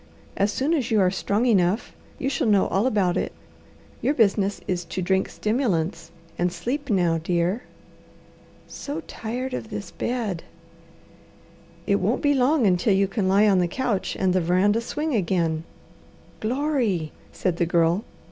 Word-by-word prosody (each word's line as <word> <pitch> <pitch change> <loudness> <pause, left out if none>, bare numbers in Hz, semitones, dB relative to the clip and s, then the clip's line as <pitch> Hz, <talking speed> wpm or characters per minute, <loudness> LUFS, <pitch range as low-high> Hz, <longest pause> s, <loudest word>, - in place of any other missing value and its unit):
As 200 +1 +1
soon 275 +9 0
as 270 -8 0
you 220 -3 +3
are 185 -2 +4
strong 205 +4 0
enough, 200 -2 +2 0.2
you 265 - -2
shall 270 - 0
know 205 -3 +4
all 200 +6 +2
about 195 -7 +1
it. - - -1 0.7
Your 290 - +1
business 200 -4 +2
is 180 -1 -1
to 175 - -5
drink 190 +1 +1
stimulants 180 - -1 0.3
and 175 0 +1
sleep 250 - -4
now, 175 -5 +2
dear." 175 +6 0 1.0
"So 295 +3 -6
tired 250 0 -5
of 225 - -5
this 205 -2 -6
bed!" 225 -9 -2 1.4
"It - - +2
won't - - 0
be 290 0 +4
long 265 0 +3
until 190 +2 +3
you 195 0 +3
can 195 -1 -1
lie 200 +3 +4
on 195 -3 +4
the 175 - +2
couch 215 0 -2
and 190 -2 +2
the 185 - +2
veranda 190 +6 +2
swing 300 +5 -3
again." 170 -6 0 0.7
"Glory!" 235 - 0 0.2
said 180 -2 -1
the 170 - +1
Girl. 170 +3 +2
200 Hz, 155 wpm, -24 LUFS, 180-245 Hz, 1.4 s, are